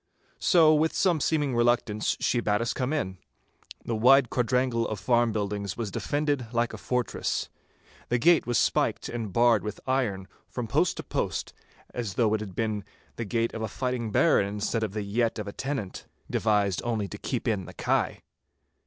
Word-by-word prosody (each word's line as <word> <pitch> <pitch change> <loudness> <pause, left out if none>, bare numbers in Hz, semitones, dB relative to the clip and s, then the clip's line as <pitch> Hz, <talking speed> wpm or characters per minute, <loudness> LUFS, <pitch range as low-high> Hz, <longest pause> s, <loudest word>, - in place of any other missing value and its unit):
So 160 -3 +5
with 155 +1 +2
some 175 -4 +2
seeming 145 -5 +1
reluctance 120 -3 +1
she 120 - +1
bade 105 -3 +1
us 115 0 -1
come 130 +1 -2
in. 95 - -2 0.7
The 115 - -1
wide 125 +3 +5
quadrangle 125 -1 +1
of 110 - -3
the - - -13
farm 120 -2 +3
buildings 100 -2 -3
was 115 -4 -3
defended 145 - -1
like 120 0 0
a - - -7
fortress. 125 -2 -2 0.6
The 120 - +2
gate 165 +3 +4
was 120 - +1
spiked - - +1
and 115 -4 -4
barred 115 +1 +4
with 105 -1 -5
iron 115 -8 -1 0.2
from 125 - -4
post 105 - +1
to - - -5
post, - - -3 0.4
as 115 -7 -4
though 110 -3 +2
it 110 - +1
had 100 -4 -7
been 110 -2 -1 0.3
the 115 - -3
gate 115 +3 -1
of 110 - -5
a 110 - -1
fighting 125 0 -3
baron 130 -7 +4
instead 105 +3 -2
of 110 -3 -2
the 105 -1 -2
yett 115 +4 0
of 105 -1 -5
a 100 - -6
tenant, 130 -9 -4 0.2
devised 105 -4 +1
only 110 -4 -1
to 105 - -8
keep 125 -1 -3
in 105 -5 0
the - - -10
kye. - - 0
115 Hz, 190 wpm, -27 LUFS, 105-125 Hz, 0.7 s, So